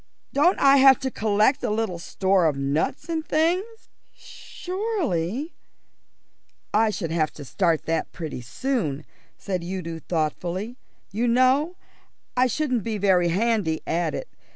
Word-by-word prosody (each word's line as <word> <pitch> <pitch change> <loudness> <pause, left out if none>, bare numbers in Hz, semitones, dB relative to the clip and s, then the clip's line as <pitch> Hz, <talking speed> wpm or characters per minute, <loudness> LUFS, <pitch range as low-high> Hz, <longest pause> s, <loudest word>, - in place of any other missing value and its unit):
Don't 320 +7 +4
I 275 0 +6
have 265 -1 +7
to 265 -1 -2
collect 215 +5 +2
a 245 - -1
little 210 -5 -1
store 190 0 +1
of 145 -3 0
nuts 140 - -1
and 325 -2 -2
things?" 360 +9 -1 0.2
"Surely 325 - -4 0.5
" - - -46 0.3
"I 220 +1 +4
should 180 -6 -3
have 160 -2 +1
to 145 - -10
start 165 +2 0
that 165 0 -1
pretty 155 -7 -6
soon," 155 - -2 0.3
said 185 -3 -3
Udo 170 -2 -5
thoughtfully. 175 +7 -3 0.4
"You 225 +5 0
know, 260 +8 +3 0.6
I 250 +1 +4
shouldn't 255 -3 -1
be 220 +1 -2
very 185 -3 +3
handy 195 -3 0
at 170 +1 -1
it. - - -5
210 Hz, 140 wpm, -24 LUFS, 170-270 Hz, 0.6 s, have